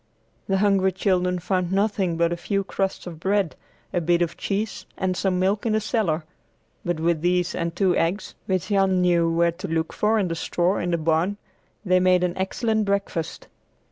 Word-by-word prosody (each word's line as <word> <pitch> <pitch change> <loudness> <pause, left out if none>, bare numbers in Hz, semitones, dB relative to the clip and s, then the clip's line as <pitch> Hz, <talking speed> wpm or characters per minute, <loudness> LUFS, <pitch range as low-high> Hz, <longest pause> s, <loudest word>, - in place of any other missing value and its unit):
The 195 - +2
hungry 195 -1 +3
children 180 -1 +1
found 180 0 -1
nothing 195 -3 +1
but 170 0 +2
a - - -1
few 195 +3 -1
crusts 195 0 -2
of 170 -3 -8
bread, 195 -1 0 0.4
a 175 - +1
bit 175 +1 +2
of 170 - -3
cheese, 205 +2 -3
and 185 -1 0
some 185 0 0
milk 195 +4 +1
in 225 -3 0
the 215 - +3
cellar, 205 -8 0 0.6
but 175 -2 -1
with 165 -1 +1
these 180 0 +1
and 170 -1 -3
two 185 -1 +2
eggs, 175 +5 -1
which 185 +1 -1
Jan 195 -2 +3
knew 170 -2 +3
where 170 +1 +3
to 185 +4 -7
look 160 0 -1
for 215 +1 +2
in 200 -4 +1
the 165 - -2
straw 175 +3 0
in 175 - -2
the 170 - +1
barn, 165 +5 +1 0.5
they 185 -1 +4
made 180 0 +4
an 180 0 0
excellent 220 +3 0
breakfast. 200 -5 -2
185 Hz, 195 wpm, -24 LUFS, 170-195 Hz, 0.6 s, they